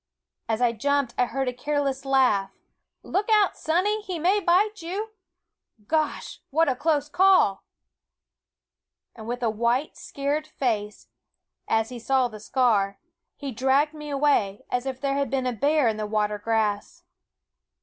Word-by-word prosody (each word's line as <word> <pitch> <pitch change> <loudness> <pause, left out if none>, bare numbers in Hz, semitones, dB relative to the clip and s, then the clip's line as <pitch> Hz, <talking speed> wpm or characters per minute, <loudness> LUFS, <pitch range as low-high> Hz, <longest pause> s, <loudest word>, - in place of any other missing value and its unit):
As 225 +2 0
I 240 - +4
jumped 280 +1 0
I 250 - +2
heard 270 +2 -2
a 250 - -1
careless 275 0 -2
laugh 255 -8 +3 0.3
" - - -58
Look 405 +4 -1
out, 420 -3 +4
Sonny, 380 +7 0
he 375 -4 -5
may 365 +6 +2
bite 405 +3 +2
you 395 +7 -4 0.7
Gosh! 310 +3 -2
what 325 +3 +2
a 260 - +1
close 295 +1 0
call 360 - +3 1.5
I" - - -16
And 220 - -8
with 245 +1 -4
a 225 - +2
white, 235 +6 0
scared 285 +2 -3
face, 215 -8 -3 0.6
as 225 0 +1
he 250 -1 -7
saw 260 +2 +2
the 215 -2 -10
scar, 210 -4 +1 0.4
he 280 -2 -6
dragged 265 +5 +2
me 300 -1 -8
away, 275 -9 +1
as 250 +1 -1
if 260 -1 -4
there 275 0 -1
had 280 -2 -1
been 265 0 -1
a 250 - 0
bear 285 +3 +2
in 220 -1 0
the 215 -1 -3
water 210 -1 -1
grass. 210 -1 -1
270 Hz, 160 wpm, -25 LUFS, 225-305 Hz, 1.5 s, I